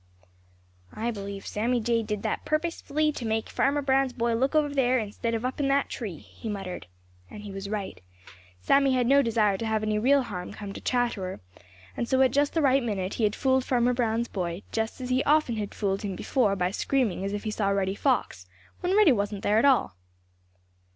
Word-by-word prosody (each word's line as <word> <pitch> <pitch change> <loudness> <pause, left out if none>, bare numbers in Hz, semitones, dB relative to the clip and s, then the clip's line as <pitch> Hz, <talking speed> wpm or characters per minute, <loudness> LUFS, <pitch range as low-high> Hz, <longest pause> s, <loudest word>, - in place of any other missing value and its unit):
"I 235 +2 -1
believe 200 -2 -7
Sammy 240 +4 0
Jay 230 0 +1
did 210 -2 -4
that - - -2
purposely 310 -1 0
to 275 - -7
make 220 -1 -1
Farmer 285 +1 +1
Brown's 270 -1 +2
boy 235 -1 0
look 265 +6 0
over 295 -2 +2
there 255 -2 +3
instead 230 +1 -2
of 225 +2 -3
up 255 - -3
in 280 - +1
the 275 +1 +3
tree," 205 -9 -5
he 220 - -9
muttered. 195 - -5 0.4
And 210 - -10
he 205 - -7
was 195 +1 -6
right. 205 - -4 0.6
Sammy 275 - +3
had 250 -1 +2
no 280 +3 +5
desire 215 -5 +1
to 230 - -3
have 220 -1 0
any 215 0 0
real 270 +4 +4
harm 180 -6 -6
come 200 -2 -7
to - - -8
Chatterer, 235 -7 -1 0.6
and 235 - -3
so 260 - +2
at 260 - +3
just 285 +4 +1
the 325 - +2
right 270 0 +4
minute 200 -5 -2
he 225 - +1
had 210 - 0
fooled 260 -1 +2
Farmer 245 -1 +2
Brown's 235 -1 0
boy, 180 -1 -4
just 225 +3 -2
as 255 0 -4
he 255 +1 +2
often 295 -6 +3
had 205 -2 -4
fooled 195 -2 -1
him 200 -3 -4
before 215 -1 +1
by 180 -1 0
screaming 225 -4 0
as 195 - -2
if 205 0 -4
he 215 - -2
saw 205 -2 0
Reddy 195 -1 0
Fox, 200 - -1 0.3
when 370 +3 +1
Reddy 420 -8 +7
wasn't 205 -3 -1
there 210 +2 +3
at 230 - +3
all. 260 - +3
230 Hz, 210 wpm, -27 LUFS, 205-265 Hz, 0.6 s, Reddy